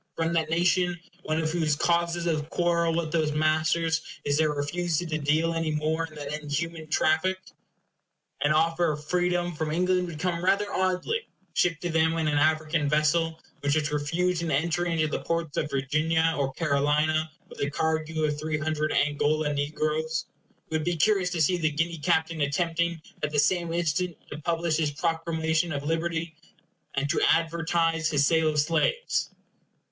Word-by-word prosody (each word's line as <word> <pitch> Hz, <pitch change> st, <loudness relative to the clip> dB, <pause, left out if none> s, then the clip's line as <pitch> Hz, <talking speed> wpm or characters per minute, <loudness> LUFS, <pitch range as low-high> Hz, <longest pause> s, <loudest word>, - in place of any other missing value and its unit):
from 165 Hz, +1 st, 0 dB
that 160 Hz, -2 st, +1 dB
nation, 175 Hz, +1 st, +2 dB, 0.2 s
one 155 Hz, -2 st, -1 dB
of 160 Hz, -1 st, 0 dB
whose 160 Hz, -3 st, +1 dB
causes 170 Hz, +2 st, +1 dB
of 155 Hz, -2 st, -1 dB
quarrel 170 Hz, -1 st, +1 dB
with 165 Hz, -2 st, -1 dB
those 155 Hz, -2 st, +1 dB
masters 155 Hz, +2 st, +1 dB, 0.2 s
is 145 Hz, -, +1 dB
their 155 Hz, 0 st, +3 dB
refusal 165 Hz, +4 st, -1 dB
to 155 Hz, -2 st, -2 dB
deal 155 Hz, +3 st, +1 dB
any 165 Hz, -1 st, -1 dB
more 155 Hz, +2 st, -1 dB
in 155 Hz, -, -16 dB
that 145 Hz, -1 st, -5 dB
inhuman 155 Hz, +2 st, -3 dB
traffic? 160 Hz, +4 st, +2 dB, 1.0 s
An 145 Hz, +1 st, +3 dB
offer 165 Hz, +1 st, +2 dB
of 150 Hz, 0 st, -8 dB
freedom 175 Hz, +1 st, 0 dB
from 160 Hz, -1 st, -3 dB
England 180 Hz, +2 st, +1 dB
would 165 Hz, -3 st, -7 dB
come 175 Hz, +1 st, -2 dB
rather 200 Hz, +2 st, +3 dB
oddly, 185 Hz, -, 0 dB, 0.3 s
shipped 170 Hz, -2 st, +1 dB
to 175 Hz, -, -1 dB
them 160 Hz, 0 st, +3 dB
in 160 Hz, -1 st, 0 dB
an 145 Hz, -1 st, +2 dB
African 155 Hz, 0 st, +1 dB
vessel 160 Hz, +2 st, +1 dB, 0.2 s
which 145 Hz, +1 st, +1 dB
is 150 Hz, -1 st, 0 dB
refused 165 Hz, +4 st, 0 dB
an 170 Hz, -, -2 dB
entry 170 Hz, +4 st, 0 dB
into 160 Hz, -2 st, +1 dB
the 155 Hz, -, -2 dB
ports 165 Hz, -3 st, -2 dB
of 150 Hz, -, 0 dB
Virginia 155 Hz, +4 st, +1 dB
or 135 Hz, -1 st, -1 dB
Carolina 150 Hz, +1 st, +1 dB, 0.2 s
with -, -, -13 dB
a 140 Hz, -, +1 dB
cargo 160 Hz, +1 st, -1 dB
of 150 Hz, -1 st, 0 dB
three 155 Hz, 0 st, -1 dB
hundred 155 Hz, 0 st, -1 dB
Angola 150 Hz, +1 st, +1 dB
negroes. 155 Hz, +2 st, -1 dB, 0.4 s
It -, -, -10 dB
would 155 Hz, 0 st, 0 dB
be 175 Hz, +1 st, 0 dB
curious 195 Hz, +1 st, +3 dB
to 170 Hz, -2 st, -2 dB
see 180 Hz, +4 st, +2 dB
the 160 Hz, -2 st, +1 dB
Guinea 160 Hz, +2 st, -2 dB
captain 160 Hz, +2 st, +1 dB
attempting 170 Hz, +3 st, 0 dB, 0.2 s
at 150 Hz, -, -1 dB
the 150 Hz, -, -1 dB
same 170 Hz, +3 st, +2 dB
instant 170 Hz, +1 st, -1 dB
to 145 Hz, -, -6 dB
publish 165 Hz, 0 st, 0 dB
his 155 Hz, -2 st, +1 dB
proclamation 160 Hz, +1 st, -1 dB
of 140 Hz, -2 st, -3 dB
liberty, 165 Hz, +1 st, -2 dB, 0.6 s
and 140 Hz, +1 st, 0 dB
to -, -, 0 dB
advertise 165 Hz, -1 st, +1 dB
his 145 Hz, -2 st, +3 dB
sale 160 Hz, +1 st, +3 dB
of 150 Hz, -1 st, 0 dB
slaves. 165 Hz, -, +1 dB
160 Hz, 175 wpm, -27 LUFS, 150-170 Hz, 1.0 s, their